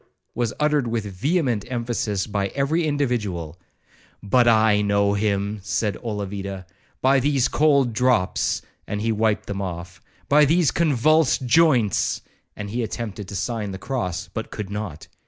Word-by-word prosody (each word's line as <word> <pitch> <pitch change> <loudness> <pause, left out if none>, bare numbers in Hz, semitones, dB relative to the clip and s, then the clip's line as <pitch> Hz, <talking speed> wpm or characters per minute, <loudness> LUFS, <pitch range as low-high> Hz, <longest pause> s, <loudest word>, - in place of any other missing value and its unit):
was 120 -1 -1
uttered 150 -4 +2
with 115 -2 -2
vehement 120 - 0
emphasis 115 -5 -1
by 100 -2 -1
every 155 +4 +1
individual 105 - -2 0.6
'But 120 +4 +3
I 110 -2 +4
know 100 0 +2
him,' 100 0 -1
said 105 +1 -1
Olavida, 100 -3 -4 0.4
'by 135 +1 +5
these 135 -1 +2
cold 140 -5 +3
drops!' 125 -5 +1 0.2
and 105 - -3
he 115 - +1
wiped 110 -1 +1
them 100 -1 -4
off,—'by 95 - -1
these 160 -1 +3
convulsed 155 -2 +2
joints!' 125 - +3 0.3
and 105 -1 -6
he 120 +3 -1
attempted 110 -3 -5
to 100 - -7
sign 105 +3 -2
the 95 - -5
cross, 95 -5 -3
but 110 - -4
could 105 -2 -6
not. 100 -7 -5
110 Hz, 140 wpm, -23 LUFS, 100-130 Hz, 0.6 s, by